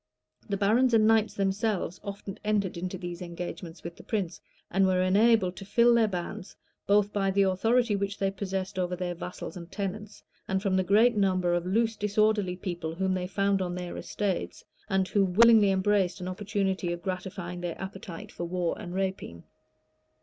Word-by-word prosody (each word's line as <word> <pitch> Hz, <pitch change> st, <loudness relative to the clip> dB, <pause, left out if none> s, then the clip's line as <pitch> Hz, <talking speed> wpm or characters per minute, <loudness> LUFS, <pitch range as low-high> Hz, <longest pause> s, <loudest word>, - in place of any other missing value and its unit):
[*] -, -, -33 dB
The 200 Hz, -, 0 dB
barons 230 Hz, +5 st, +3 dB
and 215 Hz, -1 st, +5 dB
knights 220 Hz, -1 st, +3 dB
themselves 195 Hz, -2 st, -1 dB
often 200 Hz, 0 st, -7 dB
entered 210 Hz, -3 st, 0 dB
into 180 Hz, +2 st, -4 dB
these 175 Hz, -1 st, -6 dB
engagements 175 Hz, -1 st, -7 dB
with 170 Hz, 0 st, -7 dB
the -, -, -12 dB
prince; 190 Hz, -7 st, -3 dB, 0.3 s
and 195 Hz, +1 st, +3 dB
were 185 Hz, -1 st, +2 dB
enabled 195 Hz, -1 st, +3 dB
to -, -, -7 dB
fill 235 Hz, +4 st, +4 dB
their 230 Hz, -2 st, +4 dB
bands, 180 Hz, -1 st, -5 dB, 0.3 s
both 205 Hz, 0 st, +3 dB
by 195 Hz, -1 st, +1 dB
the 195 Hz, +1 st, +3 dB
authority 225 Hz, +4 st, +2 dB
which 200 Hz, +1 st, -2 dB
they 195 Hz, -1 st, 0 dB
possessed 190 Hz, -1 st, -4 dB
over 180 Hz, 0 st, -1 dB
their 180 Hz, 0 st, -3 dB
vassals 180 Hz, +3 st, -7 dB
and 170 Hz, -1 st, -9 dB
tenants, 205 Hz, +1 st, -5 dB, 0.2 s
and 190 Hz, 0 st, 0 dB
from 190 Hz, -1 st, 0 dB
the 185 Hz, -, +3 dB
great 220 Hz, +6 st, +4 dB
numbers 185 Hz, -3 st, +2 dB
of 175 Hz, 0 st, -2 dB
loose, 225 Hz, +3 st, +1 dB
disorderly 210 Hz, -2 st, +1 dB
people 175 Hz, -3 st, -4 dB
whom 190 Hz, +1 st, 0 dB
they 180 Hz, -1 st, -2 dB
found 200 Hz, 0 st, +1 dB
on 180 Hz, -1 st, -2 dB
their 180 Hz, -1 st, -5 dB
estates, 200 Hz, -3 st, -3 dB, 0.2 s
and 190 Hz, -2 st, +1 dB
who 200 Hz, +1 st, +3 dB
willingly 215 Hz, +2 st, +6 dB
embraced 190 Hz, -1 st, +1 dB
an 180 Hz, -, -5 dB
opportunity 190 Hz, -1 st, -1 dB
of 175 Hz, 0 st, -5 dB
gratifying 185 Hz, -1 st, -5 dB
their 175 Hz, -2 st, -4 dB
appetite 190 Hz, -2 st, -7 dB
for 175 Hz, -, -5 dB
war 175 Hz, -1 st, -1 dB
and 175 Hz, 0 st, -7 dB
rapine. 190 Hz, -, -3 dB
190 Hz, 185 wpm, -28 LUFS, 180-205 Hz, 0.3 s, willingly